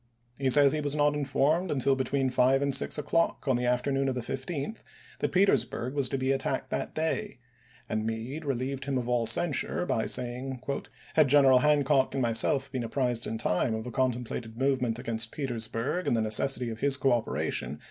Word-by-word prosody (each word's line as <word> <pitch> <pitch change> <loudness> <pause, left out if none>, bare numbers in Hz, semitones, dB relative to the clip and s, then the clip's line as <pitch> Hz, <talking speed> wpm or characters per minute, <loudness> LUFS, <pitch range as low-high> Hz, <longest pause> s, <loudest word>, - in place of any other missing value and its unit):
He 135 -1 +1
says 140 +2 +7
he 155 - -1
was 145 0 -1
not 145 0 +2
informed 150 +5 0
until 135 -1 +1
between 130 0 -1
five 130 +2 +3
and 140 -1 0
six 135 - +1
o'clock 150 +1 0
on 130 - +3
the 120 0 -1
afternoon 135 +2 0
of 130 - -2
the 125 - -3
15th 140 - -5 0.4
that - - -1
Petersburg 180 -9 +1
was 140 -3 0
to 135 - -2
be 130 0 0
attacked 135 0 -2
that - - -3
June,i86±. - - 0
day; - - -5 0.5
and 110 0 -2
Meade 115 +8 -4
relieved 135 0 -3
him 140 -2 -1
of 120 -1 -3
all 120 -2 +1
censure 145 +7 +1
by 110 -9 -1
saying, 125 +1 -3 0.5
"Had 155 -3 +4
General 135 -2 +6
Hancock 145 -1 +2
and 135 - 0
myself 120 +4 +2
been 130 -3 -3
apprised 120 0 -1
in 110 - -3
time 110 +1 0
of 110 - -4
the 125 - -7
contemplated 120 -2 -2
movement 130 -3 0
against 115 -1 -2
Petersburg 120 +4 -3
and 120 - +2
the - - +1
necessity 115 +3 +2
of 110 - -7
his 140 +1 +2
coopera 120 -5 0
tion 70 +4 -3
130 Hz, 195 wpm, -28 LUFS, 120-140 Hz, 0.5 s, says